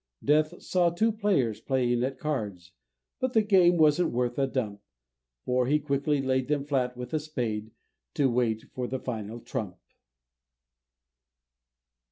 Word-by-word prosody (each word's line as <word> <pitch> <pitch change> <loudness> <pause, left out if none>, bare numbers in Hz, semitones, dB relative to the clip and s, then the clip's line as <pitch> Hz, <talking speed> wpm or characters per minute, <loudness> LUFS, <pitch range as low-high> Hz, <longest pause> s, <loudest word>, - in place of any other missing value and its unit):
Death 155 +3 +2
saw 180 -2 +2
two 215 +7 +1
players 195 - 0
playing 125 -2 +1
at 130 +1 -2
cards, 105 - -4 0.5
But 255 -1 -1
the 220 - +4
game 185 -4 +5
wasn't 155 +2 +4
worth 120 +1 -1
a 135 - +2
dump, 110 -7 -3 0.6
For 125 0 +1
he 150 +3 +4
quickly 140 -1 0
laid 130 -1 0
them 145 -1 0
flat 125 -4 -1
with 125 +4 -7
a 155 - +2
spade, 120 -8 -3 0.5
To 140 - +3
wait 120 -3 0
for 125 -1 -3
the 130 - -2
final 115 -2 -5
trump! 110 -9 -5
130 Hz, 145 wpm, -28 LUFS, 120-155 Hz, 0.6 s, game